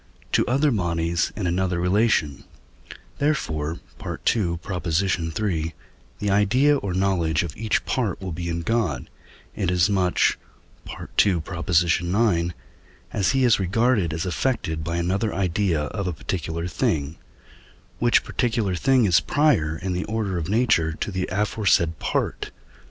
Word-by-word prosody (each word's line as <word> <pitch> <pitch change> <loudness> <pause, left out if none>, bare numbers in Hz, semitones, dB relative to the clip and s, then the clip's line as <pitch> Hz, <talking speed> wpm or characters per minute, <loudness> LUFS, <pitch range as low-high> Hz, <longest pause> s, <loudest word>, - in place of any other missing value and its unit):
to - - +3
other 140 +4 +2
bodies 85 -4 0
in 105 - -3
another 90 0 0
relation; 90 -5 +1 0.8
therefore 80 - -1 0.2
(II. 90 -7 0
iii.) 85 -1 -1 0.4
the 105 -1 -1
idea 125 +9 +4
or 100 -8 -4
knowledge 85 -5 +1
of 85 - -6
each 110 0 -1
part 115 -8 -1
will 95 -2 -5
be 85 +1 -4
in 85 0 -2
God, 90 - -1 0.4
inasmuch 90 0 +2 0.9
(II. 90 -5 +1
ix.) 85 +1 +1 0.6
as 100 - +2
he 135 -1 +2
is 120 -4 +4
regarded 100 -1 +1
as 80 +4 -3
affected 90 -5 -1
by 85 +2 -3
another 95 +5 -1
idea 90 -3 0
of 100 +5 -4
a 90 - -1
particular 80 +2 -4
thing, 80 -3 -1 0.8
which 120 0 +3
particular 115 -6 -1
thing 130 +6 +3
is 90 -4 +5
prior 135 - +1
in 90 +3 -3
the 90 - -2
order 105 -5 -2
of 80 +1 -4
nature 105 -8 +2
to 100 - -4
the 95 -1 -2
aforesaid 95 -5 +1
part - - -1
(II. - - -12
90 Hz, 135 wpm, -24 LUFS, 85-105 Hz, 0.9 s, is